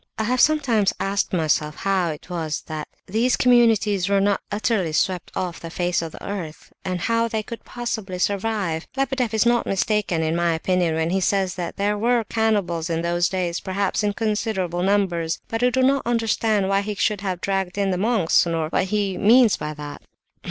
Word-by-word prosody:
I 220 - -1
have 250 +3 +1
sometimes 250 -10 +3
asked 195 +1 -1
myself 155 -3 0
how 190 -2 0
it 150 -1 -7
was 165 -4 -3
that 155 -1 -5 0.2
these 230 +6 +1
communities 225 -6 +3
were 200 0 +3
not 200 0 +1
utterly 205 -5 0
swept 180 +1 0
off 180 -2 -3
the 165 - -7
face 175 0 -1
of 165 -1 -5
the - - -10
earth, 175 -6 -6
and 180 -2 -3
how 230 +2 +1
they 220 -1 -2
could 235 +2 -8
possibly 220 -6 -4
survive. 195 -4 -1
Lebedeff 270 -4 0
is 220 +1 +2
not 240 0 +2
mistaken, 195 -4 0
in 160 +1 0
my 170 -1 +1
opinion, 175 -1 0
when 160 +1 0
he 190 +1 +1
says 190 -1 +1
that 175 -2 -5
there 205 +1 0
were 235 +1 +2
cannibals 200 -7 0
in 165 0 -1
those 175 +1 +1
days, 180 -2 -2
perhaps 190 +1 -1
in 205 -1 +1
considerable 210 -5 -1
numbers; 180 -4 0
but 225 +1 -3
I 250 - +4
do 260 +1 +1
not 275 +1 +3
understand 225 -3 +1
why 195 0 +2
he 210 +1 -4
should 205 0 0
have 185 -3 -3
dragged 195 -1 -2
in 200 -1 +1
the 180 - 0
monks, 205 -6 +3
nor 165 -2 -1
what 180 - +1
he 200 -1 -1
means 230 +1 +5
by 150 0 -5
that." 145 -1 -8
195 Hz, 195 wpm, -22 LUFS, 175-220 Hz, 0.2 s, means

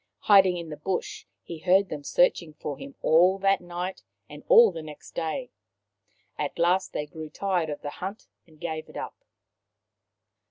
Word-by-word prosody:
Hiding 190 -3 +5
in 170 -2 -6
the 150 - -7
bush, 180 +5 -4 0.2
he 165 - -8
heard 190 +3 +3
them 150 -2 -6
searching 170 0 +2
for 145 -2 -5
him 140 - -10
all 180 +4 +5
that 195 0 +2
night 175 +1 -5 0.3
and 145 0 -11
all 230 -3 +8
next 155 -1 -11
day. 245 +11 -3 0.9
At 145 - -3
last 180 +3 +2
they 150 - -3
grew 155 0 -9
tired 180 -2 -1
of 145 - -6
the 145 - -4
hunt 195 +7 -7 0.2
and 155 -2 -21
gave 160 -2 -5
it - - -10
up. - - -7
175 Hz, 165 wpm, -26 LUFS, 155-190 Hz, 0.9 s, all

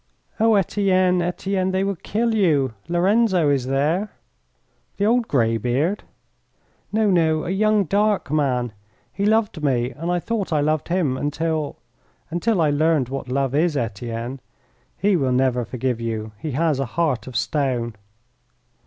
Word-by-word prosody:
"Oh, 225 0 +4
Etienne, 185 -2 +2
Etienne, 185 +2 -1
they 190 +1 0
will 200 0 -1
kill 225 +7 -1
you. 150 - +2
Lorenzo 180 -2 +3
is 130 -3 0
there." 155 +10 0 0.9
"The 200 - +1
old 235 +1 +2
greybeard?" 125 - 0 0.9
"No, 215 -1 +2
no, 160 -3 +2
a 175 - -2
young 210 +1 +3
dark 205 -3 +1
man. 125 -6 0 0.4
He 200 +8 0
loved 215 -7 +1
me, 125 -3 +1
and 165 +7 -4
I 175 - +1
thought 210 0 -3
I 155 - +2
loved 155 +1 0
him 170 -7 0
until 155 +1 -2 0.5
until 175 +3 +1
I 150 -2 +3
learned 150 -3 +2
what 135 -1 -5
love 135 0 0
is, 155 +1 +2
Etienne. 115 +2 -4 0.6
He 205 -1 +2
will 135 -6 +1
never 125 -1 +2
forgive 125 -1 -2
you. 110 -1 -3
He 150 +3 -4
has 155 0 +1
a 135 - 0
heart 140 -10 0
of 125 -3 -4
stone." 125 -6 -1
155 Hz, 150 wpm, -22 LUFS, 130-190 Hz, 0.9 s, Oh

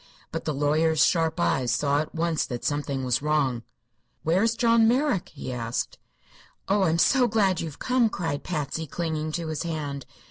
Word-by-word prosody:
But - - -4
the 155 - -1
lawyer's 155 +3 +3
sharp 165 -2 +1
eyes 120 +9 +1
saw 140 +4 +1
at 155 +2 -4
once 165 -1 0
that 120 -3 -5
something 145 -2 -1
was 125 -1 +1
wrong. 145 -5 +1 0.6
"Where 170 +4 +2
is 225 +1 +2
John 230 -1 +4
Merrick?" 250 - +1
he 135 -3 -7
asked. 115 -1 -3 0.7
"Oh, 200 +1 +2
I'm 165 -1 +2
so 250 +8 +4
glad 200 -5 +2
you've 160 -4 -6
come!" 250 -3 +2
cried 165 -8 -3
Patsy, 155 -1 -3
clinging 155 0 -3
to 165 -1 -3
his 155 - -3
hand. 145 -6 -4
160 Hz, 175 wpm, -26 LUFS, 140-180 Hz, 0.7 s, John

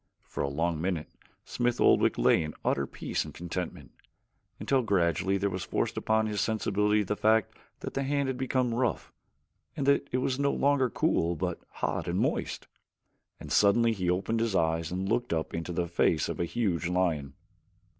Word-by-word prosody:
For - - -5
a - - 0
long 80 +3 -1
minute 90 -3 -2 0.4
Smith 120 0 -1
Oldwick - - +4
lay - - +4
in 75 -1 -5
utter 70 0 +1
peace - - -3
and - - -10
content 90 +1 -5 0.7
until 135 -1 +2
gradually 95 -3 +1
there 100 +1 0
was 95 0 -3
forced - - -1
upon 110 0 +1
his 105 -2 -1
sensibilities 105 -1 +1
the 105 - -1
fact 110 0 +2 0.3
that - - -5
the 135 - -1
hand 140 0 0
had 130 - -1
become 130 -1 0
rough, 120 -2 -1 0.7
and 140 - -1
that 140 0 +3
it 125 - +1
was 130 +1 -1
no 140 0 +2
longer 140 -2 +2
cool 85 -5 +1
but 90 +1 -3
hot - - -3
and - - -1
moist; - - -1 0.7
and - - -9
suddenly 115 +3 +4
he 90 -4 -2
opened 95 +6 0
his 115 -3 0
eyes 80 -1 +1
and 95 +2 -2
looked 120 -2 0
up 80 -1 -2
into 85 +1 -4
the 85 0 -1
face 85 -2 +1
of - - -5
a 85 - +1
huge 90 -4 -1
lion. 85 -6 0
100 Hz, 185 wpm, -29 LUFS, 85-120 Hz, 0.7 s, Oldwick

